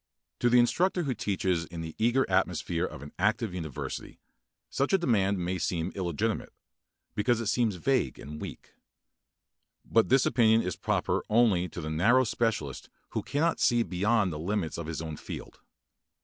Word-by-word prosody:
To 120 - +3
the 125 - +5
instructor 175 +9 +3
who 135 -4 -1
teaches 95 -5 -1
in 85 0 -7
the 80 -1 -6
eager 120 +4 +3
atmosphere 85 -1 0
of 70 - -8
an 75 - -9
active 110 +1 +1
university 80 -6 -6 0.5
such 140 +6 -1
a - - +7
demand 100 - +2
may 90 +1 -2
seem 85 0 -1
illegitimate, 95 +4 -2 0.6
because 120 +2 +1
it 115 - -3
seems 110 -1 +1
vague 130 +8 0
and 75 +1 -8
weak. - - -9 1.1
But 115 - +3
this 130 +1 +4
opinion 115 -2 +4
is 90 -2 -2
proper - - 0
only 105 -6 +3
to 85 - -7
the 80 0 -4
narrow 115 +12 +4
specialist 110 - -2 0.2
who - - -2
cannot 160 +4 0
see 120 -1 +3
beyond 100 0 +1
the 75 - -5
limits 90 -1 -2
of 85 - -5
his 80 0 -4
own 80 -2 -5
field. - - -8
105 Hz, 165 wpm, -29 LUFS, 85-120 Hz, 1.1 s, a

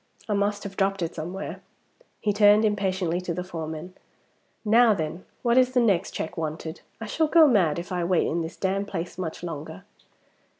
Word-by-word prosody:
"I 210 - 0
must 205 0 0
have 195 -1 -7
dropped 195 -2 +1
it 165 - -3
somewhere." 175 +5 -6 0.6
He 210 - 0
turned 210 +1 +6
impatiently 190 -4 0
to 175 -2 -3
the 180 - -3
foreman, 165 0 -6 0.7
"Now 225 0 +5
then! 160 +1 -4 0.2
What 240 +1 +4
is 255 0 +3
the - - +6
next 200 -6 +2
check 170 +3 -5
wanted? 160 +1 -4 0.2
I 225 - -5
shall 315 +9 +1
go 325 +1 +7
mad 185 - +3
if 175 +2 -6
I 180 -1 -1
wait 175 0 +2
in 170 +2 -1
this 165 +1 -5
damned 195 +1 -1
place 180 -1 -5
much 170 -1 -5
longer!" 150 - -6
185 Hz, 185 wpm, -26 LUFS, 165-205 Hz, 0.7 s, go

